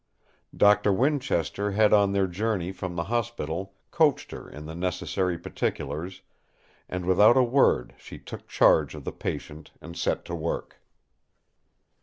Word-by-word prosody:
Doctor 105 Hz, 0 st, +5 dB
Winchester 105 Hz, -, 0 dB
had 105 Hz, +1 st, +4 dB
on 100 Hz, -2 st, +4 dB
their 100 Hz, -1 st, +2 dB
journey 95 Hz, 0 st, -2 dB
from 95 Hz, -2 st, -6 dB
the 85 Hz, -, -1 dB
hospital, 100 Hz, -4 st, -3 dB, 0.2 s
coached 155 Hz, -4 st, +2 dB
her -, -, -9 dB
in 75 Hz, +1 st, -10 dB
the 80 Hz, -, -7 dB
necessary 90 Hz, 0 st, -2 dB
particulars, 85 Hz, +3 st, -4 dB, 0.7 s
and 90 Hz, -1 st, -4 dB
without 105 Hz, +7 st, +5 dB
a 130 Hz, -, +6 dB
word 130 Hz, +3 st, +2 dB
she -, -, -11 dB
took -, -, -10 dB
charge -, -, +3 dB
of -, -, -9 dB
the -, -, -4 dB
patient 75 Hz, +1 st, -6 dB
and 85 Hz, +1 st, -10 dB
set -, -, -1 dB
to 85 Hz, -, -7 dB
work. 85 Hz, 0 st, -4 dB
95 Hz, 145 wpm, -26 LUFS, 85-110 Hz, 0.7 s, a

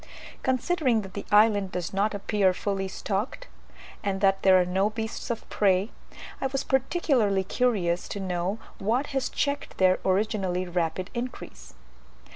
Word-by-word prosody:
Considering 260 Hz, -2 st, +1 dB
that 190 Hz, -1 st, -10 dB
the -, -, -6 dB
island 205 Hz, -2 st, +4 dB
does 180 Hz, 0 st, -4 dB
not 205 Hz, +2 st, +1 dB
appear 200 Hz, -2 st, +1 dB
fully 195 Hz, -1 st, -2 dB
stocked, 205 Hz, -, -3 dB, 0.6 s
and 195 Hz, -2 st, -1 dB
that 195 Hz, -1 st, +3 dB
there 190 Hz, -1 st, +6 dB
are 180 Hz, -, +3 dB
no 190 Hz, +3 st, +1 dB
beasts 220 Hz, +3 st, -5 dB
of 235 Hz, -, -4 dB
prey, 195 Hz, +1 st, +2 dB, 0.5 s
I 270 Hz, -, +1 dB
was 275 Hz, +1 st, -2 dB
particularly 265 Hz, -, +1 dB
curious 190 Hz, -5 st, 0 dB
to 200 Hz, -, -4 dB
know 185 Hz, +1 st, -2 dB, 0.2 s
what 230 Hz, +8 st, +1 dB
has 270 Hz, -1 st, 0 dB
checked 285 Hz, 0 st, -2 dB
their 185 Hz, -1 st, +4 dB
originally 190 Hz, -2 st, 0 dB
rapid 175 Hz, +1 st, -2 dB
increase. 235 Hz, -, -7 dB
200 Hz, 145 wpm, -27 LUFS, 185-235 Hz, 0.6 s, there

